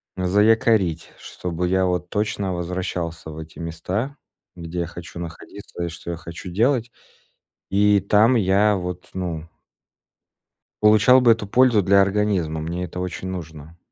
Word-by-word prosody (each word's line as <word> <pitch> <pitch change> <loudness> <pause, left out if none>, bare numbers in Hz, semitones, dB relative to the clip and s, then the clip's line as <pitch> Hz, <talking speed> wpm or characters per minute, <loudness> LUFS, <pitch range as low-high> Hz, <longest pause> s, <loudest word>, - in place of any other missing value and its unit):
заякорить, 100 -2 +2
чтобы 90 0 -4
я 95 +1 +2
вот 90 -1 -1
точно 100 -2 -1
возвращался 85 -2 -4
в 80 - -9
эти 80 +1 -10
места, 90 - -4 0.4
где 85 0 -4
хочу 85 0 -9
находиться 85 +2 -8
и 85 - -2
что 85 +1 -7
я 85 - -4
хочу 85 +2 -9
делать. 120 +5 +1 0.8
И 100 +1 +4
там 105 +6 +4
я 105 0 +3
вот, 90 0 -6
ну 85 -3 -4 1.3
Получал 110 +5 +6
бы 120 - +6
эту 110 -2 0
пользу 120 0 +4
для 100 +1 +5
организма. 95 -6 0
Мне 85 +3 -4
это 90 +1 -7
очень 90 +1 -4
нужно. 80 -2 -8
90 Hz, 140 wpm, -22 LUFS, 85-105 Hz, 1.3 s, Получал